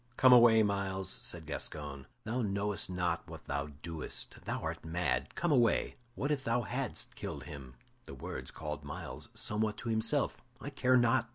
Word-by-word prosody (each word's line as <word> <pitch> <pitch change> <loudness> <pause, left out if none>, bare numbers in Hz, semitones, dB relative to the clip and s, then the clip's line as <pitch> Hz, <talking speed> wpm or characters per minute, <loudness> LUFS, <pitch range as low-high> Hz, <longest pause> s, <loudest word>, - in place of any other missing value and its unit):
"Come 130 -1 +8
away, 115 -2 +8
Myles," 100 -2 -1
said - - -3
Gascoyne; 70 -3 -3 0.2
"thou 120 +4 -1
knowest 100 -2 0
not 90 -2 -1
what - - -9
thou 70 +1 -2 0.2
doest; 80 -2 -3
thou - - -1
art - - -4
mad; 80 -5 -1
come 175 -2 +1
away. 120 -5 +3 0.2
What 140 +3 -1
if 140 -3 0
thou 120 0 +1
hadst - - -2
killed - - -5
him?" 70 -4 -9 0.3
The - - -8
words - - -6
called 75 -1 -5
Myles 70 - -6
somewhat 105 0 0
to 120 - -4
himself. 115 +5 +2 0.2
"I 140 - -6
care 130 -2 +4
not!" 120 -1 +3
105 Hz, 170 wpm, -33 LUFS, 80-120 Hz, 0.3 s, Come